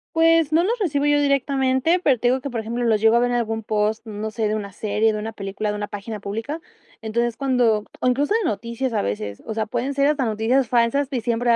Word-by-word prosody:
Pues, 325 -2 +4
no 335 +2 +4
los 460 +4 0
recibo 290 -7 0
yo 290 0 +4
directamente, 275 +3 +2
pero 270 -7 +3
te 245 +2 +1
digo 260 +1 +2
que, 280 - -5
por 235 -2 -3
ejemplo, 235 +2 -3
los 220 -2 +2
llevo 225 +1 +5
a - - +4
ver 245 0 +1
en - - +1
algún 225 -2 -1
post, 215 +1 -1
mm, 210 -1 -6
no 220 0 -3
sé, 220 -1 -1
de 215 - 0
una 200 -2 -5
serie, 215 +2 +1
de 215 - -3
una 220 +1 -5
película, 205 +1 -3
de - - -4
una 205 0 -4
página 205 +1 -6
pública, 225 +11 -4 0.4
entonces, 235 +1 -1
cuando, 245 -6 +2 0.2
o - - 0
incluso 285 - +2
de 445 -4 +1
noticias 235 +3 -3
a - - +1
veces, 100 +1 -4
o 220 - -4
sea, 220 0 -1
pueden 245 +5 -2
ser 280 +1 +2
hasta 295 -3 +1
noticias 225 +3 +1
falsas, 250 +4 +2
que 260 -4 -1
siempre 235 +1 0
va 235 - +6
235 Hz, 260 wpm, -22 LUFS, 215-275 Hz, 0.4 s, va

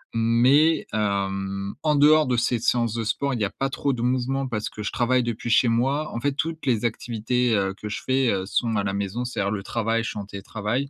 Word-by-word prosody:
mais 125 +8 +4
hem, 100 -1 -2
en 150 -1 +2
dehors 150 +1 +5
de 125 -1 +1
ces 120 0 +1
séances 115 -1 +1
de 115 0 -2
sport, 140 +5 -1
il 120 - -2
y - - +3
a - - -2
pas 135 +6 -3
trop 140 +1 -1
de 120 - -4
mouvement 130 +2 0
parce 110 -4 -3
que 105 - -8
je - - -2
travaille 125 +1 +2
depuis 120 0 -4
chez 120 +2 +4
moi. 135 +6 0
En - - -3
fait, 140 +3 0
toutes 160 +2 -3
les 120 -3 +1
activités, 120 +1 0
heu, 95 -1 0
que 105 +2 -8
je 105 - -4
fais, 130 -1 +2
heu, 95 -1 -1
sont 115 +3 0
à 100 - +1
la 95 -1 -2
maison, 100 +5 -3
c'est-à-dire, 100 -5 -2
le 100 -2 -3
travail, 115 +1 -1
je - - -3
suis - - -5
en 100 - -5
télétravail, 105 +6 -3
115 Hz, 240 wpm, -24 LUFS, 105-130 Hz, -, dehors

